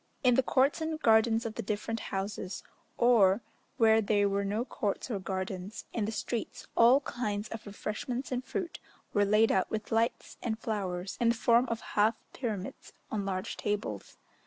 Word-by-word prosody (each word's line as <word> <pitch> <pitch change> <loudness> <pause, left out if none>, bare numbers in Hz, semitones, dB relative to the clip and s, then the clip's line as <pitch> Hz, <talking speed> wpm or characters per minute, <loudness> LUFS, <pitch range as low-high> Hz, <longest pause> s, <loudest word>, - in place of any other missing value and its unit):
In 250 -1 +6
the 260 - +5
courts 270 +4 +2
and 315 0 -2
gardens 225 -2 +4
of 225 - -3
the - - -4
different 215 +2 -2
houses, 195 -1 -4 0.3
or, 225 -4 +5 0.4
where 225 -2 +5
there 205 -1 +2
were 200 0 0
no 210 +4 -1
courts 210 +1 -3
or 205 - -1
gardens, 190 +1 -4
in 220 -3 0
the 215 - -2
streets, 225 +1 -4
all 245 +4 +6
kinds 215 -6 -3
of 225 -1 -7
refreshments 240 +6 -4
and 255 0 -1
fruit 365 +4 -4 0.3
were 205 -1 +4
laid 215 +2 +4
out 190 - +2
with 215 -1 -4
lights 225 +1 0
and 220 -2 -2
flowers, 195 -5 -3
in 235 - +4
the 235 - +3
form 235 +2 +4
of 230 -1 -2
half 215 +2 +4 0.2
pyramids 215 -7 -5 0.2
on 205 -2 -2
large 185 -1 -3
tables. 205 +1 -3
220 Hz, 175 wpm, -30 LUFS, 200-235 Hz, 0.4 s, In